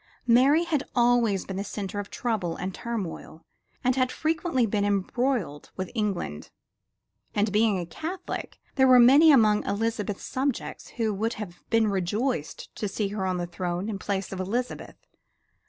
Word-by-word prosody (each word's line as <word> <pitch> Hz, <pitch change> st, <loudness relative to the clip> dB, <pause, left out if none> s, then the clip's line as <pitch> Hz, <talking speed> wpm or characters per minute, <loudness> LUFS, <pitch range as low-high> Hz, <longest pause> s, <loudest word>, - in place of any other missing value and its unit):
Mary 265 Hz, +7 st, +5 dB
had 320 Hz, -5 st, 0 dB
always 240 Hz, -5 st, +3 dB
been 190 Hz, -, -5 dB
the 200 Hz, -, -2 dB
center 205 Hz, -1 st, -5 dB
of 205 Hz, -, -5 dB
trouble 210 Hz, -8 st, -2 dB
and 185 Hz, +1 st, -4 dB
turmoil 190 Hz, -8 st, -6 dB, 0.4 s
and 250 Hz, 0 st, +2 dB
had 255 Hz, -1 st, +1 dB
frequently 320 Hz, -5 st, 0 dB
been 205 Hz, -1 st, 0 dB
embroiled 205 Hz, -, -1 dB
with 185 Hz, -1 st, -4 dB
England; 195 Hz, -, -3 dB, 0.9 s
and 205 Hz, 0 st, +1 dB
being 210 Hz, -1 st, +3 dB
a 175 Hz, -, -3 dB
Catholic 350 Hz, -, -6 dB, 0.2 s
there 265 Hz, -1 st, +6 dB
were 255 Hz, -1 st, +8 dB
many 280 Hz, +7 st, +8 dB
among 215 Hz, -6 st, +5 dB
Elizabeth's 210 Hz, -1 st, -2 dB
subjects 265 Hz, -1 st, -3 dB
who 220 Hz, -3 st, +1 dB
would 220 Hz, +4 st, -1 dB
have 185 Hz, -5 st, -8 dB
been 225 Hz, -1 st, +3 dB
rejoiced 200 Hz, -, -2 dB
to 210 Hz, -, -2 dB
see 200 Hz, +1 st, -2 dB
her 200 Hz, -2 st, -2 dB
on 185 Hz, -1 st, 0 dB
the 175 Hz, -, -2 dB
throne 175 Hz, +2 st, -3 dB
in 200 Hz, -3 st, -4 dB
place 195 Hz, 0 st, -3 dB
of 190 Hz, -, -5 dB
Elizabeth. 235 Hz, +7 st, -3 dB
210 Hz, 160 wpm, -26 LUFS, 190-245 Hz, 0.9 s, were